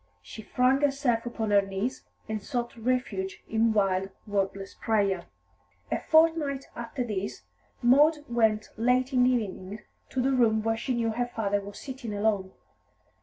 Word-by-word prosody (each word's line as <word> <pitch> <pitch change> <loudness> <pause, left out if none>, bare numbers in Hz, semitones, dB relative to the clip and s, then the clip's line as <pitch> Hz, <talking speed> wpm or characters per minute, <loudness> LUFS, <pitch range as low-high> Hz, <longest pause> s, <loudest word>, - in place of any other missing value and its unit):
She 95 - -9
flung 255 +5 +2
herself 275 -5 +1
upon 220 -3 -2
her 200 -1 +6
knees 195 +7 -4 0.2
and 220 -1 -3
sought 240 0 -3
refuge 225 -5 -2
in 225 +1 +2
wild, 195 -2 +1 0.2
wordless 195 -1 -2
prayer. 200 -5 0 0.7
A - - +1
fortnight 315 -4 +3
after 235 +1 -4
this 205 -4 -4 0.4
Maud 295 +5 +5
went 220 -3 +1
late 250 +3 +2
in 250 -1 +5
the - - +5
evening 210 -4 -2 0.3
to 260 - -3
the 265 +2 +2
room 225 -4 +3
where 225 0 +1
she 250 +3 -2
knew 230 -1 0
her 245 +2 -1
father 205 -4 -1
was 200 +1 -9
sitting 260 -6 -6
alone. 205 -2 0
225 Hz, 155 wpm, -28 LUFS, 205-255 Hz, 0.7 s, her